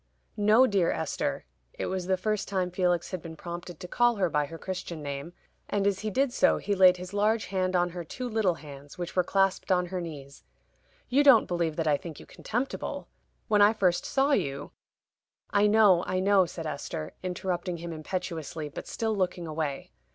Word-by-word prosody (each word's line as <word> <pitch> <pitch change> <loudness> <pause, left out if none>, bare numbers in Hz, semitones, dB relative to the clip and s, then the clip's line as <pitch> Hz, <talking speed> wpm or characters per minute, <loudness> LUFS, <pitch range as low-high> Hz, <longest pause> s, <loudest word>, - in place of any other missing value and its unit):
"No, 215 +5 +5
dear 195 -7 +2
Esther" 160 - -2 0.3
it - - -4
was 185 -1 -3
the 190 0 +2
first 215 +2 -1
time 185 -2 -1
Felix 175 -2 0
had 185 -3 -4
been 160 0 -8
prompted 175 0 -8
to 180 - -7
call 240 +4 +3
her 185 -5 0
by 150 0 +1
her 165 - -8
Christian 175 -3 -6
name, 140 +4 -5 0.4
and 200 -1 0
as 200 -2 +1
he 215 - -3
did 260 +4 +1
so 280 +1 +4
he 205 - -2
laid 185 -2 +6
his 180 +2 -8
large 215 +2 +2
hand 185 -1 -1
on 175 0 +2
her 175 0 -6
two 250 +10 -6
little 215 -6 +1
hands, 145 -3 -12
which 175 -1 -5
were 180 - +4
clasped 195 +1 +1
on 180 -1 +3
her 180 0 -4
knees. 140 - -9 0.6
"You 275 +3 +3
don't 275 -6 +7
believe 170 -3 -1
that 165 - -1
I 145 -1 +4
think 160 -1 -9
you - - -12
contemptible. 245 +5 -4 0.4
When 210 -1 +3
I 205 +2 +7
first 180 -5 +1
saw 275 +2 +2
you 140 - -1 0.4
" - - -66 0.3
"I 205 0 +4
know, 205 -5 +5
I 185 - 0
know," 190 -1 +4
said 165 -1 -7
Esther, 140 - -5
interrupting 180 -1 -3
him 170 0 -6
impetuously, 160 -2 -4
but - - -8
still 220 -1 -1
looking 180 -3 -1
away. 155 -3 -4
180 Hz, 200 wpm, -28 LUFS, 165-205 Hz, 0.6 s, don't